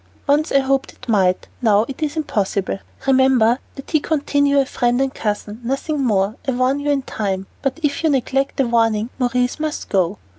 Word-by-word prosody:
Once 295 Hz, +3 st, +2 dB
I -, -, +4 dB
hoped 270 Hz, 0 st, 0 dB
it 255 Hz, -, -15 dB
might, 190 Hz, -5 st, +2 dB
now 215 Hz, -2 st, +4 dB
it 275 Hz, -, -8 dB
is 305 Hz, 0 st, -2 dB
impossible; 200 Hz, -9 st, -1 dB, 0.3 s
remember 260 Hz, -3 st, +4 dB, 0.2 s
that 275 Hz, -, -10 dB
he 310 Hz, -, +4 dB
continue 285 Hz, -2 st, +1 dB
a 275 Hz, -, +3 dB
friend 245 Hz, -1 st, 0 dB
and 270 Hz, -1 st, 0 dB
cousin, 210 Hz, +1 st, -3 dB
nothing 275 Hz, +4 st, -1 dB
more. 210 Hz, -1 st, +1 dB
I 265 Hz, -, +1 dB
warn 255 Hz, +3 st, +1 dB
you 290 Hz, +1 st, -2 dB
in 280 Hz, -2 st, +1 dB
time, 195 Hz, -5 st, -3 dB, 0.2 s
but 270 Hz, +3 st, -2 dB
if 290 Hz, +2 st, 0 dB
you 320 Hz, -, +3 dB
neglect 270 Hz, 0 st, 0 dB
the 270 Hz, -, +2 dB
warning, 225 Hz, -1 st, +1 dB
Maurice 250 Hz, +1 st, 0 dB
must 310 Hz, 0 st, -3 dB
go. 190 Hz, 0 st, +1 dB
260 Hz, 190 wpm, -20 LUFS, 220-280 Hz, 0.3 s, I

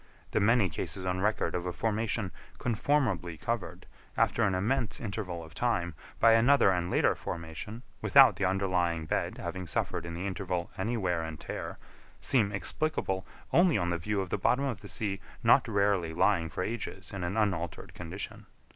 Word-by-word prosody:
The -, -, +2 dB
many 110 Hz, 0 st, +4 dB
cases 95 Hz, +3 st, -3 dB
on 90 Hz, 0 st, 0 dB
record 105 Hz, +2 st, +1 dB
of 90 Hz, 0 st, -2 dB
a -, -, -1 dB
formation 110 Hz, -1 st, -1 dB, 0.3 s
conformably 110 Hz, -, 0 dB
covered, 115 Hz, +3 st, -3 dB, 0.3 s
after -, -, +2 dB
an 95 Hz, -3 st, +3 dB
immense 110 Hz, +4 st, 0 dB
interval 100 Hz, -6 st, -4 dB
of 80 Hz, -2 st, -13 dB
time, 85 Hz, -3 st, 0 dB, 0.3 s
by 115 Hz, -, +7 dB
another 120 Hz, -1 st, +5 dB
and 90 Hz, -1 st, 0 dB
later -, -, +3 dB
formation, 85 Hz, +8 st, -6 dB, 0.2 s
without -, -, +7 dB
the 100 Hz, -, +1 dB
underlying 90 Hz, -4 st, +1 dB
bed -, -, -1 dB
having 95 Hz, -2 st, -5 dB
suffered 85 Hz, -, -1 dB
in 85 Hz, -, -5 dB
the 90 Hz, +3 st, -4 dB
interval 90 Hz, -2 st, -3 dB
any 115 Hz, +5 st, -1 dB
wear 90 Hz, -5 st, 0 dB
and 80 Hz, -1 st, -6 dB
tear, -, -, -5 dB, 0.4 s
seem 110 Hz, -6 st, +2 dB
explicable 100 Hz, -, -2 dB, 0.3 s
only 175 Hz, -, +5 dB
on 90 Hz, -2 st, 0 dB
the 85 Hz, -1 st, -1 dB
view 100 Hz, +4 st, -1 dB
of 95 Hz, -, -6 dB
the -, -, 0 dB
bottom 135 Hz, +8 st, +2 dB
of 120 Hz, -7 st, -2 dB
the 100 Hz, -, -10 dB
sea 95 Hz, +1 st, -2 dB, 0.2 s
not -, -, +5 dB
rarely 100 Hz, -6 st, +1 dB
lying 85 Hz, -2 st, +3 dB
for 90 Hz, -, -3 dB
ages 110 Hz, 0 st, -5 dB
in 95 Hz, -2 st, -4 dB
an 90 Hz, +5 st, -2 dB
unaltered 90 Hz, -6 st, -1 dB
condition. 90 Hz, +3 st, -6 dB
95 Hz, 175 wpm, -30 LUFS, 85-110 Hz, 0.4 s, by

